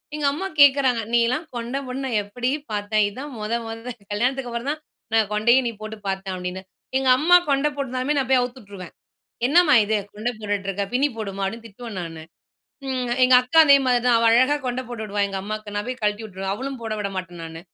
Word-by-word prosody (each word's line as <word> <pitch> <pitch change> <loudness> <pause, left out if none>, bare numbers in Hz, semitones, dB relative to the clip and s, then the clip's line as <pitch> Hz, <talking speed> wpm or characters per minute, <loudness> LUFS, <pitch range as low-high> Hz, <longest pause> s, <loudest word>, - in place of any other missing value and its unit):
எங்க 300 -1 -2
அம்மா 375 +6 -3
கேட்கறாங்க, 270 -4 +5
"நீயல்லாம் 240 +7 +2
கொண்ட 240 +3 -3
போட்டு 255 +1 -5
நா - - -2
எப்படி 245 +5 -3 0.2
பார்த்தேன்? 210 +1 +1
இதான் 265 +7 -8
மொத 215 +2 -3
மொத. 225 +2 -7 0.2
கல்யாணத்துக்கு 250 +4 -1
அப்பறம் 235 +3 -3
தான் 305 0 -6 0.3
நா 225 - +5
கொண்டையே 235 +5 +4
நீ - - -1
போட்டு 215 0 -6
பார்த்தேன்." 190 0 -3
அப்படீன்னு. 180 +1 -5 0.3
எங்க 265 -1 +1
அம்மா 355 +3 +7
கொண்ட 275 +1 +2
போட்டிருந்தாலுமே 270 +1 -2
நா 270 - +2
போய் 260 - +6
அவுத்து 245 +1 -5
உட்ருவேன். 195 -4 -10 0.5
"என்னம்மா 300 +1 +5
இது 215 +1 +1 0.2
கொண்ட 220 +4 -2
போட்டுட்ருக்க? 200 -1 -2
பின்னி 275 +4 +3
போடுமா." 195 -2 -4
அப்படீன்னு 230 +4 -6
திட்டுவேன் 220 -1 -8
நானு. 165 -1 -8 0.6
ம் 255 -2 -2
எங்கக்கா 250 +4 +5
அதே 280 -1 +8
மாரி 250 -1 +4
தான், 240 - +5
அவ 230 - +1
அழகா 260 +5 +4
கொண்ட 250 +1 -1
போட்டு 235 -3 -5
விடுவா 205 -1 -3
எங்க 195 -1 -4
அம்மாக்கு, 215 0 -6
நா 205 - +1
போய் 255 0 -5
கழட்டி 210 +1 0
வுட்ருவேன். 190 -1 -4
அவளும் 265 +2 -5
போட 225 -1 -3
விட 200 -1 -2
மாட்டேன் 175 -2 -6
நானு. 165 0 -8
235 Hz, 200 wpm, -23 LUFS, 205-260 Hz, 0.6 s, அதே